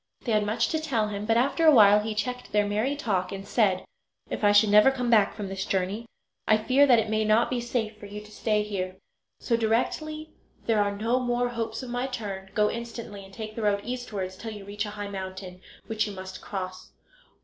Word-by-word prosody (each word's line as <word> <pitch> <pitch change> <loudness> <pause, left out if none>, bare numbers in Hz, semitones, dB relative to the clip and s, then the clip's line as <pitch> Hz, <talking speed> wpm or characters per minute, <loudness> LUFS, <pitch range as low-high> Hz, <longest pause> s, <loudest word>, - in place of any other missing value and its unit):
They 240 - -2
had 210 -1 +3
much 225 +2 +1
to 315 - 0
tell 235 -9 0
him, 205 0 -5
but 225 0 +3
after 275 +7 +1
a - - +10
while 210 -5 +7
he 215 +1 -3
checked 250 +4 -3
their 210 0 +3
merry 215 +7 0
talk 190 -9 -1
and 195 0 -7
said: 195 -6 +2 0.5
"If - - -4
I 205 - +6
should 205 0 +5
never 210 +5 +7
come 250 -3 -1
back 210 -3 +4
from 205 -2 -5
this 190 0 -4
journey 195 +4 -2 0.4
I 215 - +5
fear 265 +6 +4
that 245 -3 +6
it 225 - +1
may 215 0 +1
not 215 +3 +3
be 245 -1 0
safe 230 -3 -2
for 205 - -10
you 205 +1 -7
to 210 0 -15
stay 210 -1 0
here; 185 -3 -4 0.5
so 235 - +1
directly 305 +8 -1 0.3
there 220 -2 +3
are 205 0 -1
no 230 +4 +1
more 245 -1 0
hopes 230 -1 -4
of 245 - -7
my 245 +1 -1
return 200 -6 -5
go 210 -1 +4
instantly 230 -3 -6
and 195 - -14
take 215 +2 -7
the 230 - -4
road 205 -1 +1
eastwards 215 -6 -4
till 225 +2 -6
you 205 -2 -9
reach 205 +1 -3
a 210 0 -8
high 205 0 -4
mountain, 190 -2 -7 0.2
which 215 0 -1
you 205 - -6
must 190 0 -8
cross. 185 -2 -6
215 Hz, 225 wpm, -27 LUFS, 200-235 Hz, 0.5 s, a